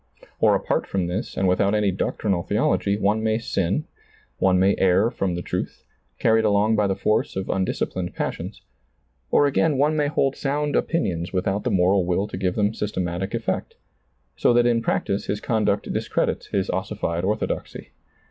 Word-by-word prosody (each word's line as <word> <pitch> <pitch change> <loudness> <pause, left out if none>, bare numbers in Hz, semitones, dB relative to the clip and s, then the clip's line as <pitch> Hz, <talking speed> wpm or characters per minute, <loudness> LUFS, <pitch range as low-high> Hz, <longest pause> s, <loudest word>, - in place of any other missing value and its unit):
Or - - +4
apart - - -1
from 95 -2 -1
this 90 +7 -4
and 95 - +2
without 100 +3 +2
any 105 -2 +2
doctrinal 95 0 -1
theology, 100 +3 +1
one 105 +2 +1
may 110 0 +1
sin, 100 - -1 0.5
one 95 -1 +3
may 95 +2 +4
err 95 +5 +3
from 95 -7 -2
the 90 - -4
truth, - - -4 0.3
carried 110 -1 +3
along 105 +1 +3
by 105 -1 +2
the 95 - 0
force 105 - 0
of 95 0 -4
undisci 95 -1 0
plined 90 -1 -5
passions; 90 +2 -4 0.7
or 145 - +4
again 145 +1 +2
one 150 +3 +2
may 150 -1 +1
hold 135 -2 +1
sound 145 +1 -1
opinions 90 - -1
without 95 +2 -1
the - - +2
moral 95 +1 +3
will 90 +3 0
to - - -6
give 90 -1 -1
them 105 0 +1
systematic 95 -2 -3
effect, 115 -1 -3 0.6
so - - +3
that 120 0 +4
in 120 -1 +2
practice 100 -3 -1
his 105 - -1
conduct 110 -2 0
discredits - - -1
his 95 -2 -1
ossified 95 -2 -2
orthodoxy. 105 +3 -3
100 Hz, 175 wpm, -23 LUFS, 95-110 Hz, 0.7 s, Or